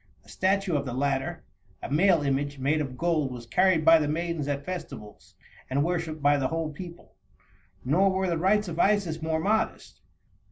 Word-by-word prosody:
A - - -19
statue 195 -2 0
of 140 -1 -1
the 125 - -4
latter, 140 +4 -1 0.4
a - - -6
male 170 +1 +3
image, 140 +1 -1
made 145 +4 0
of 130 -3 -5
gold, 155 -4 0
was 120 -1 -8
carried 170 +5 +2
by 165 0 +7
the 150 - -1
maidens 165 -1 -2
at 140 0 -3
festivals, 175 - -8 0.3
and 140 +2 +1
worshiped 160 -3 -3
by 145 0 +4
the 135 -2 0
whole 160 0 -3
people. 175 +2 -11 0.7
Nor 180 +9 +3
were 190 0 0
the 170 -2 -1
rites 205 +4 +2
of 170 -1 -5
Isis 190 -6 +1
more 160 0 -1
modest. 210 +6 -1
160 Hz, 185 wpm, -27 LUFS, 140-180 Hz, 0.7 s, by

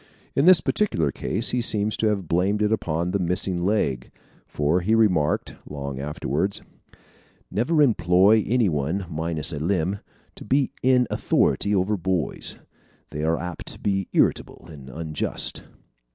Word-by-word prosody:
In 140 - +3
this 180 -3 +8
particular 85 - 0
case 115 - -1
he 125 - 0
seems 105 -2 0
to 110 - +1
have 100 -5 -1
blamed 100 +6 +1
it 105 - +1
upon 85 -5 -1
the 100 - 0
missing 90 0 0
leg, 70 - 0 0.4
for 75 +4 0
he 110 +6 +2
remarked, 90 -10 +1 0.2
long 70 -2 -6
afterwards: 75 +6 -2 0.9
"Never 150 +8 +2
employ 100 -2 +4
any 120 -1 +2
one 80 +4 -1
minus 80 +1 -1
a 75 - -4
limb 90 +3 -1 0.3
to - - -12
be 135 -1 +1
in 125 -1 +3
authority 105 0 +1
over 100 +3 +1
boys. 90 -3 -2 0.6
They 75 0 -4
are 80 +1 +1
apt 90 0 -7
to - - -14
be 95 -2 -1
irritable - - 0
and 70 -4 -11
unjust." 80 +1 -3
90 Hz, 150 wpm, -24 LUFS, 80-105 Hz, 0.9 s, this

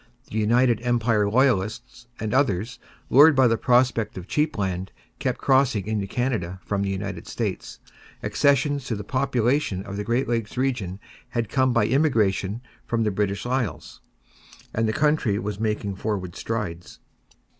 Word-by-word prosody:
The 110 - -1
United 120 +1 +3
Empire 115 -4 +1
Loyalists 120 0 0
and 110 +1 -3
others, 115 -5 0 0.3
lured 145 +3 +8
by 130 -1 +5
the 115 - +3
prospect 120 -3 +2
of 90 - -6
cheap 150 -2 0
land, 95 -1 -2 0.3
kept - - -1
crossing 130 -7 +2
into 105 -2 -2
Canada 105 -7 -2
from 100 -1 -1
the 100 - -1
United 100 +1 -4
States; - - -4 0.5
accessions 140 0 +2
to 120 - -2
the 105 - -6
population 125 -5 0
of 100 0 -7
the 105 - -2
Great 120 +5 0
Lakes 115 -1 -2
region 120 -8 -1 0.4
had 115 -3 0
come 130 -1 +2
by 115 -3 +3
immigration 115 -6 +1 0.2
from 115 -1 -1
the 105 - +1
British 100 +1 -1
Isles, 120 -11 -3 0.7
and 115 0 +1
the - - +1
country 150 -7 +1
was 105 -1 -4
making 105 -2 -1
forward 95 -5 -3
strides. 95 -7 -4
115 Hz, 155 wpm, -24 LUFS, 100-130 Hz, 0.7 s, lured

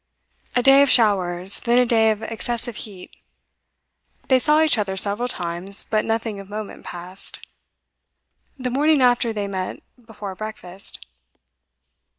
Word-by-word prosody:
A 245 - +2
day 270 +1 +7
of 280 - +4
showers, 190 -5 +2
then 240 0 +1
a 250 - +5
day 225 -2 +3
of 215 0 -1
excessive 230 +2 -4
heat. 195 -5 -10 1.1
They 260 -1 +5
saw 300 +4 +3
each 305 -7 +2
other 190 -2 -2
several 205 +5 +1
times, 180 -2 -1
but 215 -1 0
nothing 225 -2 -2
of 195 0 -11
moment 210 0 -7
passed. 180 +2 -5 1.1
The 255 -2 -3
morning 290 +1 +3
after 245 -2 +3
they 210 -2 -3
met 190 -2 -5 0.2
before 210 -3 -8
breakfast. 195 - -7
215 Hz, 140 wpm, -22 LUFS, 195-245 Hz, 1.1 s, day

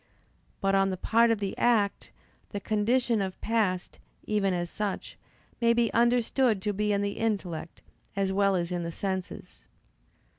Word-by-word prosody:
But 195 0 +2
on 195 0 +3
the 185 - -3
part 230 +5 +3
of 230 - +2
the 200 -1 -3
act, 220 -4 +2 0.4
the 205 - -4
condition 225 +2 +1
of 190 -1 -4
past, 210 -6 -1 0.3
even 205 -2 +1
as 175 -1 -1
such, 205 +2 -4 0.5
may 235 0 +5
be 235 -1 +1
understood 240 -1 +3
to 210 -1 0
be 210 +1 0
in 200 0 +1
the 200 0 -3
intellect, 190 -8 -3 0.3
as 195 -1 0
well 195 0 +3
as 175 -1 -1
in 175 -1 -1
the 170 0 -4
senses. 190 +1 -5
205 Hz, 160 wpm, -28 LUFS, 190-225 Hz, 0.5 s, may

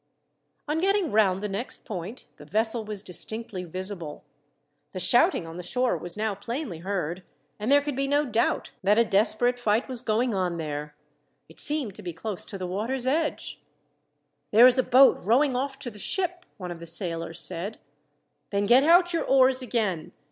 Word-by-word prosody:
On 305 +2 -1
getting 390 -2 +1
round 195 -2 +2
the - - -1
next 205 +5 -2
point, 205 +2 -6
the 150 - -13
vessel 220 +7 +1
was 210 -2 -3
distinctly 195 +2 -5
visible. 180 -2 -5 0.7
The 185 - -4
shouting 245 - +3
on 165 +1 -9
the - - -5
shore 250 +8 0
was 175 +2 -4
now 215 -1 -1
plainly 220 - -5
heard, 180 -1 -3 0.4
and 215 +5 -1
there 285 0 +6
could 290 -2 -3
be 275 +1 -1
no 290 +2 +2
doubt 230 -3 0
that 205 +2 +3
a 230 - +5
desperate 225 +4 +2
fight 225 0 +1
was 255 -3 -3
going 235 0 0
on 180 -3 -1
there. 150 -2 -5 0.5
It 160 - -12
seemed 290 -9 0
to 210 - -9
be 175 -3 -6
close 195 +4 -3
to 200 - -7
the 185 - -5
water's 225 +8 -3
edge. 305 +4 -2 0.9
"There 225 +4 +7
is 255 +1 +5
a - - +7
boat 260 +2 +5
rowing 255 +7 +2
off 270 +1 -2
to 270 -3 -5
the 210 - -13
ship," 360 - -1
one 180 -3 -6
of 170 - -8
the 170 - -9
sailors 165 -1 0
said. 180 +6 -3 0.7
"Then 200 0 0
get 245 +5 +5
out 350 +3 +5
your 335 - 0
oars 260 -1 +4
again. 210 -9 -2
215 Hz, 185 wpm, -26 LUFS, 185-260 Hz, 0.9 s, There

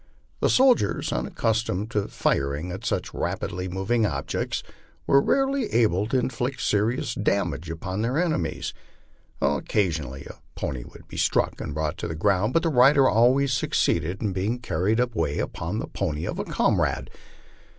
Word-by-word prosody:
The - - +2
soldiers, 255 - +3
un - - -1
accustomed 110 -2 -1
to 105 -2 0
firing 70 +6 -1
at 95 - -6
such - - -2
rapidly 90 +1 -3
moving 95 +6 0
objects, 70 -9 -2 0.4
were 140 - +5
rarely 270 - +1
able 105 -4 +2
to 130 - +1
inflict 125 +1 -2
serious 110 +4 0
damage 80 0 -1
upon 95 +5 -4
their 120 +5 0
enemies. 155 - -1 0.7
Occasionally 75 - 0
a - - -11 0.2
pony 65 -2 -3
would - - -14
be - - -9
struck - - +1
and 75 - -5
brought 75 -1 -2
to - - -3
the 80 - -4
ground, 100 +5 +2
but 165 - +3
the 165 - +2
rider 135 0 +6
always 130 +4 +4
succeeded 90 -5 0
in 100 -3 0
being 100 +6 -1
car 100 -8 -3
ried 110 +3 +3
away 110 -12 0
upon 85 +6 -3
the - - -2
pony 75 +2 -3
of - - -4
a - - -2
comrade. - - 0
105 Hz, 160 wpm, -25 LUFS, 85-125 Hz, 0.7 s, rider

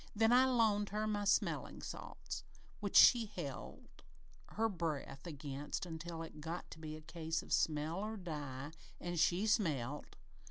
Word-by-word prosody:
Then 225 +2 +4
I 255 +1 +7
loaned 220 -5 +3
her 215 +1 -1
my 205 -1 0
smellin' - - +1
salts, - - -6 0.4
which - - -3
she 235 -3 +8
held - - -7 0.5
her 225 +1 +1
breath 160 -6 -3
against 145 +2 -4
until 165 0 -5
it 155 -2 -9
got 165 +3 -5
to - - -9
be 155 -1 -6
a 155 - -9
case 160 0 -3
of - - -4
smell 155 +3 +1
or 215 +2 -3
die, 145 -6 -5 0.3
an' 175 0 -3
she 175 +5 +3
smelt! 150 - 0
170 Hz, 155 wpm, -37 LUFS, 155-210 Hz, 0.5 s, she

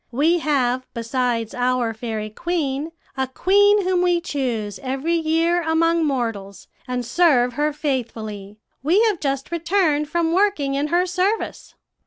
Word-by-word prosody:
We 310 +8 +2
have, 255 -5 0
besides 235 -1 -1
our 245 -2 0
fairy 220 -1 -5
queen, 310 0 -2 0.2
a 265 -1 -1
queen 405 +8 +3
whom 365 -1 +1
we 355 -1 +2
choose 245 - -3
every 270 +5 -2
year 330 +1 +1
among 330 0 +2
mortals, 225 -8 -3 0.2
and 250 -1 -3
serve 250 -3 +3
her 295 +4 0
faithfully. 220 -8 -4 0.2
We 345 - +3
have 425 -6 +1
just 275 0 -2
returned 335 -3 +1
from 335 -1 0
working 365 -8 +1
in 280 +2 0
her 350 +3 +2
service.' 370 +4 -2
290 Hz, 140 wpm, -22 LUFS, 245-340 Hz, 0.2 s, queen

